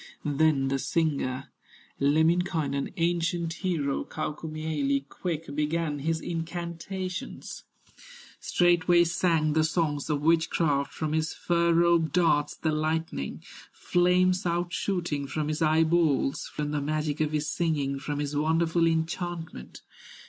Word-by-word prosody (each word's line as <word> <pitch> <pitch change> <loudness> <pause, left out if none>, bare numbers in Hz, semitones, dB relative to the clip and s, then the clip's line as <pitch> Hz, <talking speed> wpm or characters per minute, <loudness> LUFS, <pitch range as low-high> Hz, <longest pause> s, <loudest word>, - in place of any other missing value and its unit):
Then 145 -2 +2
the 135 0 0
singer, 140 -5 -1 0.5
Lemminkainen, 155 -1 +1
Ancient 170 0 0
hero, 160 -7 -1
Kaukomieli, 155 -3 -2
Quick 160 -2 -5
began 150 0 -1
his 160 +3 -1
incantations, 175 +2 -5 0.7
Straightway 175 0 +3
sang 165 -3 +1
the 155 0 +3
songs 155 -3 0
of 145 -1 0
witchcraft, 160 -3 +2
From 155 -1 -3
his 160 0 -1
fur 170 0 +1
robe 170 -2 +3
darts 155 -4 +2
the 160 - -1
lightning, 155 - -2 0.3
Flames 180 +1 +2
outshooting 175 -3 -1
from 150 +2 -2
his 155 +2 -2
eye 160 0 +4
balls, 160 -5 +1
From 150 -1 -3
the 150 -1 -1
magic 150 0 -1
of 155 -1 +1
his 155 0 -1
singing, 145 -6 -1
From 145 +1 -4
his 145 0 -3
wonderful 165 +2 +2
enchantment. 165 - -3
160 Hz, 120 wpm, -27 LUFS, 150-170 Hz, 0.7 s, eye